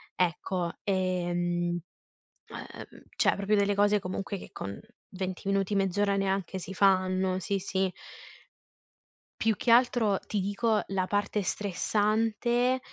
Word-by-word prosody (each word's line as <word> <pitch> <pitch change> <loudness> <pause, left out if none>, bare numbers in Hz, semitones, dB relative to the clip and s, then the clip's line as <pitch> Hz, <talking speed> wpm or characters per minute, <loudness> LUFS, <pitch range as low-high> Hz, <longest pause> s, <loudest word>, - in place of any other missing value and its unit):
Ecco, 180 0 -1
e, 185 -2 0
mhmm, 175 0 0 0.7
ehm, - - -10
cioè - - +3
proprio 200 +1 +1
delle 200 0 +3
cose 205 +1 +4
comunque 195 +2 -4
che - - -11
con 100 0 -6 0.3
20 185 0 -5
minuti, 195 0 +1
mezz'ora 200 +1 +1
neanche 195 -1 -1
si 185 +2 -7
fanno 185 -1 +2
sì, 195 +2 -1
sì. 190 0 -1 1.5
Più 225 -1 +3
che 240 - -2
altro 235 -4 +4
ti 210 - -3
dico 205 +3 +1
la 190 -1 0
parte 205 +1 0
stressante 220 +6 +1
195 Hz, 125 wpm, -29 LUFS, 185-205 Hz, 1.5 s, cose